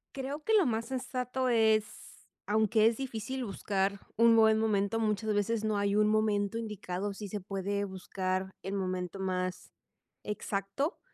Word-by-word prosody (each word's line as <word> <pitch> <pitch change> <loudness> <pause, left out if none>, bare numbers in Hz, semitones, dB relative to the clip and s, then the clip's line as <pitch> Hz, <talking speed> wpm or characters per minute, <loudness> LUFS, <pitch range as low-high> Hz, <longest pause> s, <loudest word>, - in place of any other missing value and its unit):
Creo 275 +3 -4
que 445 - +1
lo 405 -8 +5
más 225 -1 -1
sensato 255 0 -2
es 220 -2 +4 0.6
aunque 215 +1 +3
es 225 0 +4
difícil 260 0 -4
buscar 195 -1 -1 0.2
un 230 +1 +6
buen 220 -1 +5
momento, 215 0 +1
muchas 215 0 0
veces 210 +2 0
no 215 -1 +1
hay 200 0 +1
un 210 0 +4
momento 215 0 +1
indicado, 205 -3 -4
sí 205 0 -7
se 210 - -3
puede 200 +1 -2
buscar 190 0 -3
el 195 - -5
momento 185 -1 -3
más 185 -1 -2 0.5
exacto, 205 - -2
210 Hz, 150 wpm, -31 LUFS, 195-230 Hz, 0.6 s, un